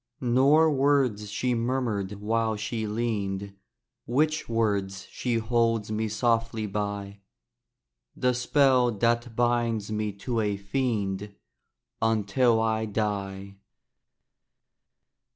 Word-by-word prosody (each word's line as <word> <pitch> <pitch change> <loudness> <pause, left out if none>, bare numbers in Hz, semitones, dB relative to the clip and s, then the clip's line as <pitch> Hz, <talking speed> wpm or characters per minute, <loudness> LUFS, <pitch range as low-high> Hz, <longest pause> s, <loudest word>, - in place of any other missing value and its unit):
Nor 140 +5 +4
words 135 -7 +2
she 125 +5 -1
murmured 115 -5 -1
while 110 +2 -1
she 110 +1 -3
leaned! 100 -3 -2 0.5
Witch 155 +5 +1
words, 100 -4 -1
she 125 -2 -2
holds 115 -1 +1
me 110 +1 -1
softly 115 0 0
by, 100 -1 -4 1.0
The 125 0 +1
spell 125 0 +3
that 120 +2 0
binds 120 -3 0
me 105 -1 -1
to 115 +4 -3
a 105 -2 0
fiend 100 -2 -2 0.7
Until 115 +2 +2
I 110 0 0
die. 100 -2 -3
110 Hz, 100 wpm, -27 LUFS, 105-120 Hz, 1.0 s, Nor